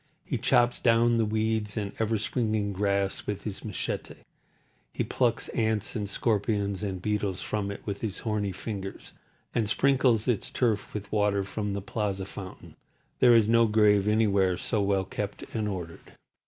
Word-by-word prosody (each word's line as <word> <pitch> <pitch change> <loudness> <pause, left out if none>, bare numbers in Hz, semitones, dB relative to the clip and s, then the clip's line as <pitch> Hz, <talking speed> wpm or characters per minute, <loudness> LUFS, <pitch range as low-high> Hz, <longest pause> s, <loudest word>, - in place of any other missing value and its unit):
He - - -2
chops 120 0 +3
down 115 0 +4
the 110 - +3
weeds 110 0 -1
and 100 -2 -2
ever 110 0 +1
springing 110 -2 -1
grass 100 0 0
with 105 -1 -3
his 105 -3 -5
machete, 105 -4 -4 0.8
he - - 0
plucks - - 0
ants 110 -1 -1
and 105 -3 -2
scorpions 100 -2 0
and 95 -3 -3
beetles 100 -1 -1
from 105 -2 -2
it 100 - -7
with 100 -1 -4
his 105 -4 -2
horny 105 -3 -1
fingers, 95 0 -6 0.4
and 110 -3 +1
sprinkles 130 -2 +3
its 120 -5 +1
turf 115 -5 0
with 100 -1 -5
water 105 -2 +2
from 100 +1 -3
the 100 - -3
plaza 100 -2 -2
fountain. 95 -1 -9 0.4
There 120 - +7
is 110 -2 +5
no 115 0 +5
grave 105 -2 +4
anywhere 100 -4 +3
so 110 +2 0
well 100 -1 +1
kept 100 +1 -5
and 110 -2 -1
ordered. 90 -5 -6
105 Hz, 165 wpm, -28 LUFS, 100-110 Hz, 0.8 s, There